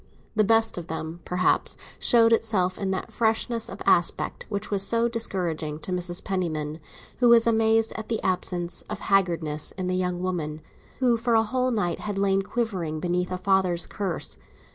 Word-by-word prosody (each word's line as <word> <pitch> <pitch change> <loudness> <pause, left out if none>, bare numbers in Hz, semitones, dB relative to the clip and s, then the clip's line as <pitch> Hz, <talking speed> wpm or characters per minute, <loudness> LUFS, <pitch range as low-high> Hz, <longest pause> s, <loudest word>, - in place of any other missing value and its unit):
The 215 - +4
best 225 -2 +3
of 170 - -9
them 160 +1 -5
perhaps 180 +1 +1 0.2
showed 230 -2 +5
itself 205 -5 +1
in 195 - -1
that 190 -1 -3
freshness 225 +1 0
of - - -7
aspect 175 -1 +1
which 205 0 -4
was 200 -1 +1
so 230 +4 +1
discouraging 175 -9 -2
to 160 +4 -7
Mrs. 180 -1 -2
Penniman, 160 -5 -2 0.4
who 245 -1 +5
was 235 -1 +7
amazed 225 -1 +3
at 220 -1 -6
the 225 - 0
absence 180 -1 -2
of - - -4
haggardness 170 -6 0
in 185 -1 -3
a - - 0
young 180 -1 -1
woman 165 -4 -3 0.4
who 245 -3 +3
for 235 0 +1
a 225 - +5
whole 255 +3 0
night 205 -8 -1
had 205 -2 -4
lain 195 0 +2
quivering 190 -8 -2
beneath 180 +2 -1
a 185 - -1
father's 185 -2 +1
curse. 180 - -4
190 Hz, 175 wpm, -26 LUFS, 175-225 Hz, 0.4 s, was